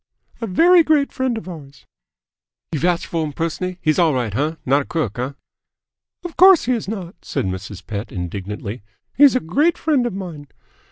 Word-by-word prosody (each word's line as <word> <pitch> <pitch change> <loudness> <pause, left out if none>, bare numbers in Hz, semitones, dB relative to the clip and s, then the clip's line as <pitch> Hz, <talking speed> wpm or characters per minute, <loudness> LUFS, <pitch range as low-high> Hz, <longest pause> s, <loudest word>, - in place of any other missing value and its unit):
"A 230 - -2
very 340 - +6
great 305 -3 +2
friend 260 -3 -1
of 220 - -8
ours." 145 -6 -11 0.9
"You 155 - -2
vouch 175 +1 0
f'r 165 -1 -1
him 150 -2 -4
pers'n'lly? 175 +3 -3
He's 155 +1 +2
all 160 -5 +3
right, 115 -5 -2
uh? 150 +6 0
Not 140 +3 +3
a - - -7
crook, 145 - -3
huh?" 130 +3 -3 0.9
"Of 350 -2 -7
course 375 -1 +7
he 250 - 0
is 230 -5 -3
not!" 190 -4 -5
said - - -2
Mrs. 95 0 -6
Pett 105 0 -5
indignantly. 100 +5 -5 0.3
"He's 285 -1 +6
a - - +3
great 290 - +1
friend 280 -6 +1
of 235 - -4
mine." 170 -7 -7
165 Hz, 185 wpm, -20 LUFS, -, 0.9 s, course